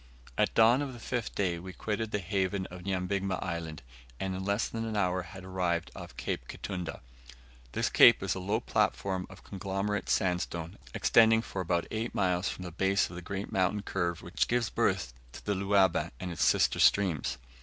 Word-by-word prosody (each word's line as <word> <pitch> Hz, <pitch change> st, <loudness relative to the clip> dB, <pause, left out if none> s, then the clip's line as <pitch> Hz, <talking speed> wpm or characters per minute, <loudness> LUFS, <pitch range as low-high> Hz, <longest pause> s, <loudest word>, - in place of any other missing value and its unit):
At -, -, +1 dB
dawn 115 Hz, +4 st, +6 dB
of 140 Hz, -3 st, -3 dB
the 120 Hz, -, -10 dB
fifth 120 Hz, -1 st, -3 dB
day 90 Hz, -4 st, 0 dB
we 95 Hz, +2 st, -8 dB
quitted 110 Hz, +3 st, -2 dB
the 105 Hz, -, 0 dB
haven 95 Hz, 0 st, -1 dB
of 90 Hz, 0 st, -8 dB
Nyabigma 95 Hz, 0 st, -1 dB
Island, 85 Hz, -5 st, -4 dB, 0.4 s
and 95 Hz, -1 st, -2 dB
in 95 Hz, +1 st, -4 dB
less 100 Hz, +3 st, +1 dB
than 115 Hz, 0 st, -4 dB
an 110 Hz, -2 st, -2 dB
hour 90 Hz, -2 st, +1 dB
had 95 Hz, +2 st, -10 dB
arrived 90 Hz, -2 st, -1 dB
off -, -, -9 dB
Cape -, -, -3 dB
Kitunda. 90 Hz, -6 st, -5 dB, 0.7 s
This -, -, +1 dB
cape -, -, +7 dB
is -, -, 0 dB
a 95 Hz, -, -4 dB
low 100 Hz, +4 st, 0 dB
platform 95 Hz, -4 st, 0 dB
of -, -, -13 dB
conglomerate 100 Hz, +1 st, -3 dB
sandstone, 90 Hz, -1 st, -1 dB, 0.2 s
extending 115 Hz, 0 st, +5 dB
for 95 Hz, -, -4 dB
about 85 Hz, -1 st, 0 dB
eight 110 Hz, +2 st, -3 dB
miles 90 Hz, -1 st, +1 dB
from 90 Hz, -, -6 dB
the 90 Hz, -, -6 dB
base 95 Hz, +4 st, +1 dB
of -, -, -8 dB
the 90 Hz, -, -6 dB
great 95 Hz, +3 st, -5 dB
mountain 95 Hz, +2 st, +1 dB
curve 85 Hz, -3 st, -2 dB
which 90 Hz, -, 0 dB
gives 120 Hz, -2 st, 0 dB
birth -, -, 0 dB, 0.2 s
to -, -, -11 dB
the 105 Hz, -, +1 dB
Luaba 95 Hz, -2 st, +2 dB
and 90 Hz, -, -4 dB
its 85 Hz, -, -1 dB
sister -, -, +3 dB
streams. 80 Hz, -10 st, +3 dB
95 Hz, 190 wpm, -30 LUFS, 90-105 Hz, 0.7 s, cape